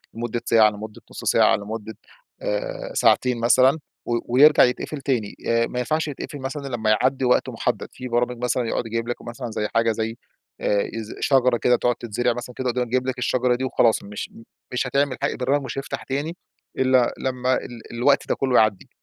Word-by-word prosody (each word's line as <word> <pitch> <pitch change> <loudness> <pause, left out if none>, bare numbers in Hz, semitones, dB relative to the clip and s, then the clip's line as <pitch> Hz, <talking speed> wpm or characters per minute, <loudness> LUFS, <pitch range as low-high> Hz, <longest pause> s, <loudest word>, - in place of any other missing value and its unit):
لمدة 120 0 -3
ساعة، 110 -2 +5
لمدة 105 0 -9
نص - - -8
ساعة، - - +4
لمدة 110 +1 -7 0.4
آآ - - -3
ساعتين 125 - +3
مثلًا 130 +5 +4 0.3
و 120 0 +1
ويرجع 150 +4 +7
يتقفل 130 +4 -1
تاني، 120 -7 -1
آآ، 115 0 +2
ما 125 - -4
ينفعش 155 +5 0
يتقفل 145 +1 -7
مثلًا 140 +1 -5
إلا 125 - -3
لمّا 110 -2 -1
يعدّي 130 0 +1
وقت 125 - +3
محدد، - - -2
في 130 - -7
برامج 120 0 -1
مثلًا 125 -1 0
يقعد - - -1
يجيب 115 +1 -3
لك 120 - -4
مثلًا 120 0 -6
زي 105 -1 -2
حاجة 115 0 +3
زي 110 +1 -3 0.4
آآ 100 -1 +1 0.3
شجرة 130 -3 +3
كده 125 +1 +3
تقعد 120 0 +1
تتزرع 120 +2 -1
مثلًا 120 +1 -7
كده 130 -1 -2
وتقعد 125 0 0
تجيب 130 +2 0
لك 130 - -2
الشجرة 125 0 +1
دي 130 - -4
وخلاص 120 -3 +2
مش 105 +1 -7 0.4
مش 125 0 0
هتعمل 140 0 0
حا - - +2
البرنامج 135 +3 0
مش 130 - -6
هيفتح 135 -3 -6
تاني 150 +6 -3 0.4
إلا 130 -2 +3
لمّا 130 0 0
ال 120 -1 -7
الوقت 130 +4 +2
ده - - +2
كلّه 130 -2 0
يعدّي، 110 -4 +2
125 Hz, 190 wpm, -23 LUFS, 115-130 Hz, 0.4 s, ويرجع